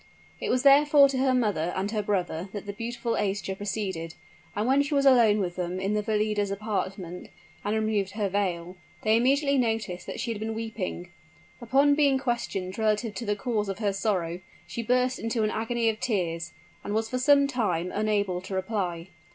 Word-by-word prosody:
It - - -3
was 255 +1 +1
therefore 285 0 +7
to 265 -1 -1
her 260 -1 +3
mother 205 -9 +1
and 195 +2 -2
her 215 -2 0
brother 185 -3 -2
that 205 -1 -6
the 200 - -5
beautiful 235 +2 -4
Aischa 195 -1 -1
proceeded; 190 -5 -4 0.4
and 210 +2 0
when 270 +3 +4
she 290 +1 -1
was 280 0 +2
alone 235 -6 +6
with 180 -3 -2
them 180 0 -2
in 195 +2 -1
the 210 - +1
Valida's 210 -1 0
apartment, 195 -3 -4 0.3
and 205 +1 0
removed 215 -3 0
her 210 -1 -1
veil, 185 -2 -2 0.3
they 215 0 +4
immediately 275 +3 +3
noticed 220 -6 -1
that - - -5
she 235 - -2
had 220 - -4
been 220 +1 -3
weeping. 210 -6 -5 0.5
Upon 275 +5 +4
being 285 -2 +3
questioned 235 -7 -3
relative 215 0 +1
to 235 -1 -6
the 205 - +1
cause 210 -1 -2
of 195 - -3
her 205 -2 0
sorrow, 180 -4 -1 0.3
she 175 +7 -5
burst 250 +2 +1
into 230 0 -1
an 215 - +1
agony 230 +1 -1
of 220 -1 0
tears, 175 -6 -1 0.3
and 205 - -3
was 220 0 0
for 255 +2 -2
some 280 +2 +5
time 195 -10 -1
unable 205 -4 0
to 190 +1 -6
reply. 190 -3 -2
210 Hz, 190 wpm, -27 LUFS, 190-235 Hz, 0.5 s, therefore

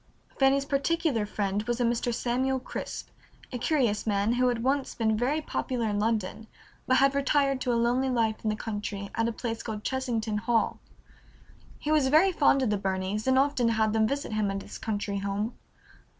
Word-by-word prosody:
Fanny's 275 0 +4
particular 280 -5 0
friend 200 -1 -1
was 240 0 -1
a - - +2
Mr. 235 +1 0
Samuel 255 +3 0
Crisp, 255 - -6 0.4
a 250 - -4
curious 240 -8 +1
man 205 +2 +2
who 250 +1 +2
had 240 -2 0
once 270 +1 0
been 220 -2 +1
very 265 +8 0
popular 250 -5 -2
in 205 0 -1
London, 220 0 -1 0.4
but 260 - +4
had 275 0 +4
retired 275 -1 +1
to 250 - 0
a - - +2
lonely 245 +3 +2
life 225 -3 0
in 220 - +1
the 215 - 0
country 205 -2 -5
at 225 0 0
a - - 0
place 230 0 -4
called 215 -2 -5
Chesington 235 -5 -1
Hall. 230 +1 0 1.0
He 300 - -3
was 300 -4 +4
very 315 +8 +5
fond 280 -5 +3
of 230 - +1
the 205 - 0
Burneys 190 +3 -2
and 260 0 +4
often 270 -3 +2
had 220 -1 +1
them 220 -1 +3
visit 280 -2 -3
him 215 -2 +1
at 195 0 -3
his - - -9
country 205 -2 -2
home. 200 +4 -2
235 Hz, 195 wpm, -28 LUFS, 215-265 Hz, 1.0 s, very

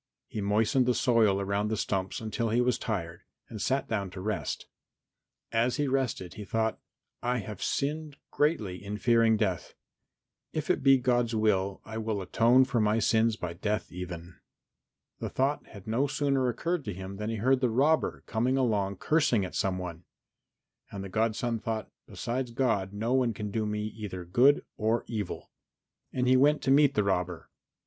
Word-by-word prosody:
He 110 -5 -5
moistened 110 +6 +2
the 125 - +3
soil 110 -5 +3
around 100 +1 0
the 110 0 -1
stumps 95 -1 -2
until 115 +1 -2
he 115 +3 +2
was 125 -1 +2
tired 85 -7 -3 0.3
and 110 -3 -6
sat 135 +6 0
down 100 -4 -2
to 95 - -9
rest. 105 +2 -3 0.9
As 115 +2 +2
he 145 - 0
rested 130 -9 -1
he 105 - -7
thought, 110 +2 -1 0.4
"I 125 +1 0
have 105 -3 -6
sinned 150 +1 -2
greatly 110 - 0
in 100 +1 -4
fearing 115 -1 +4
death. 95 -6 -2 0.8
If - - 0
it - - 0
be 135 0 +6
God's 120 -2 +1
will 100 -3 +1
I 110 0 -5
will 110 -2 -2
atone 115 +7 +4
for 130 -2 0
my 105 +1 +2
sins 115 0 +3
by 90 -5 -5
death 105 +5 -2
even." 90 -1 -7 0.8
The - - -3
thought 135 +3 0
had 100 -3 -12
no 120 +6 +1
sooner 135 -2 +1
occurred 165 +7 -2
to 105 - -3
him 95 +1 -7
than 105 +1 -3
he 115 - -2
heard 130 +5 +2
the 125 - +3
robber 145 +7 +2
come 115 +2 0
along 110 -7 +1
cursing 120 - +2
at 90 - -8
some 95 -1 0
one. 90 -2 -6 0.8
And 100 -1 -6
the 95 - -6
godson 115 +2 0
thought, 110 -2 -4 0.2
"Besides 125 +1 -3
God 115 -6 0
no 110 +4 -1
one 125 -4 +2
can 105 0 -4
do 110 0 -1
me 105 0 -2
either 105 -4 -6
good 125 +11 +4
or 110 +2 +1
evil." 105 -5 -5 0.6
And 125 -1 0
he 130 0 +6
went 145 +1 +4
to 135 - +2
meet 140 0 +5
the 105 - +3
robber. 90 -3 -2
110 Hz, 180 wpm, -29 LUFS, 100-125 Hz, 0.9 s, be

